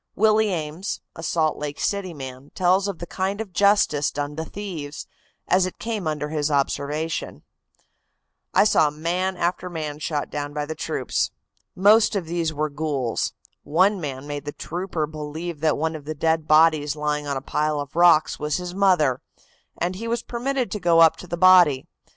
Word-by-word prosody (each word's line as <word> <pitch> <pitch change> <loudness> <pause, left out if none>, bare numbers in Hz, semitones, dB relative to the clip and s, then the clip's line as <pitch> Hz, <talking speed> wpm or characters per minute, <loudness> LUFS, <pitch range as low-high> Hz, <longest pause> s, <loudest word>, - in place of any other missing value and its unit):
Willis 220 +1 +4
Ames, 170 +1 -3
a - - -8
Salt 160 -1 0
Lake 145 -1 -5
City 200 -3 -1
man, 135 -2 -9
tells 185 +2 +3
of 200 -3 -4
the 175 - -6
kind 190 +3 -2
of 215 -5 -6
justice 200 -8 +3
done 145 0 -4
to 160 - -3
thieves, 160 -6 -6 0.4
as 185 0 +3
it 185 - -8
came 220 -7 -3
under 150 -1 -2
his 150 -1 -1
observation: 145 +2 -2 1.1
"I - - +5
saw 155 -7 +4
man 175 +5 -2
after 180 +1 -1
man 155 -3 -5
shot 150 -2 -3
down 145 0 -4
by 150 -1 -1
the 160 - -4
troops. 155 - -1 0.5
Most 210 +3 +5
of 190 -4 -1
these 165 -1 -1
were 155 0 -2
ghouls. 140 -6 -2 0.3
One 185 +6 +2
man 135 -2 -5
made 145 -1 -5
the 145 - -3
trooper 175 -2 -3
believe 155 +2 -6
that 155 -1 +1
one 160 +1 -1
of 150 -2 -9
the 155 +1 -4
dead 160 +1 0
bodies 155 -2 +4
lying 150 -1 -2
on 140 -1 -1
a - - -1
pile 150 +2 -1
of 145 0 -6
rocks 170 -3 +4
was 150 0 -1
his 180 -1 -5
mother, 180 -10 +3 0.6
and 175 +2 -1
he 225 +5 -5
was 235 0 -1
permitted 250 +1 -2
to 210 - -3
go 170 -2 +4
up 165 -1 +7
to 180 - -10
the 170 - -4
body. 175 -7 +6
160 Hz, 185 wpm, -23 LUFS, 150-185 Hz, 1.1 s, up